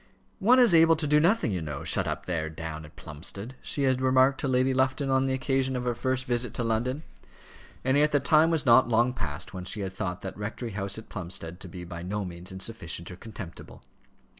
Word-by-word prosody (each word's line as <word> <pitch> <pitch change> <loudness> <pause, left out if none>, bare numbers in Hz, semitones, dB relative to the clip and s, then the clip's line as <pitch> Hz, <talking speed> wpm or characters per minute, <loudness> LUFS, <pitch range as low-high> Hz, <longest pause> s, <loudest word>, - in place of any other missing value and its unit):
"One 240 +6 +5
is 245 -7 +6
able 165 0 +7
to 155 0 -1
do 150 +1 +4
nothing, 180 - +2
you 90 -3 -2
know, 75 -3 -5
shut - - +2
up - - -3
there, 80 -3 -2
down 80 -1 -6
at 75 - -16
Plumstead," 100 - -7
she 140 - -1
had 130 -1 +2
remarked 130 +1 +4
to - - -1
Lady 130 0 +2
Lufton 130 +1 +1
on 130 0 +3
the 135 - 0
occasion 130 0 0
of 125 - -2
her 125 -1 0
first 130 +2 -1
visit 120 -1 -1
to 120 - -1
London, 120 +6 -1 0.8
and 130 +1 +2
yet 150 +1 +4
the 145 - +3
time 155 +4 +4
was 160 -3 0
not 120 0 +6
long 120 +2 +3
past 85 - -5
when 90 -1 -5
she 100 +3 -3
had 95 -1 -4
thought 90 -2 -4
that 95 - -5
rectory 110 +3 -5
house 100 0 -3
at 110 - -9
Plumstead 85 -2 -5
to 95 - -7
be 90 0 -8
by 85 0 -7
no 100 +3 -3
means 90 0 -7
insufficient 95 -3 -5
or - - -8
contemptible. 95 -3 -10
115 Hz, 225 wpm, -27 LUFS, 90-130 Hz, 0.8 s, able